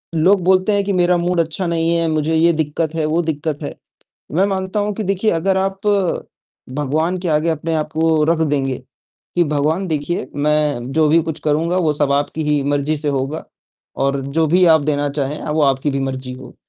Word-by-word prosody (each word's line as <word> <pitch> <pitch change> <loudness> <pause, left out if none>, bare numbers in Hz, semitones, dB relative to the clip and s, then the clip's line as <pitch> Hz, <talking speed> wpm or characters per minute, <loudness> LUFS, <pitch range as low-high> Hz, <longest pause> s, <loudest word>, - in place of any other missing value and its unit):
लोग 185 +5 +4
बोलते 185 +3 +3
हैं 200 - +2
कि 200 - 0
मेरा 180 -1 +3
मूड 175 0 0
अच्छा 165 +3 -3
नहीं 165 0 +1
है, 165 -1 +1
मुझे 155 +1 0
ये 170 +2 +4
दिक्कत 155 +1 -2
है, 160 - 0
वो 160 +3 +1
दिक्कत 155 -2 -3
है। - - -4 0.6
मैं 190 - +4
मानता 190 +1 -2
हूँ 205 0 -1
कि 215 - -3
देखिए 195 +2 +1
अगर 190 +2 +1
आप 195 0 -1 1.0
भगवान 155 +5 0
के 175 -1 -3
आगे 155 +2 +1
अपने 160 +1 -2
आप 155 -1 -1
को 160 -1 +2
रख 165 - -1
देंगे, 140 -4 0 0.6
कि 175 - +3
भगवान 155 +5 0
देखिए 150 -2 -2
मैं 145 -3 0
जो 155 -1 +3
भी 165 +2 +5
कुछ 160 -1 -5
करूँगा 160 +4 0
वो 160 -5 +2
सब 145 -1 +1
आपकी 145 +2 -1
ही 145 -2 +2
मर्ज़ी 145 +2 0
से 150 0 -3
होगा 140 +2 -2 0.6
और 140 0 0
जो 160 +3 +1
भी 180 +4 +4
आप 160 -2 +6
देना 145 -1 0
चाहें 140 +1 -3
वो 150 0 0
आपकी 135 +1 +2
भी 135 - -2
मर्ज़ी 130 -1 -4
हो। 130 0 -11
155 Hz, 205 wpm, -19 LUFS, 145-175 Hz, 1.0 s, आप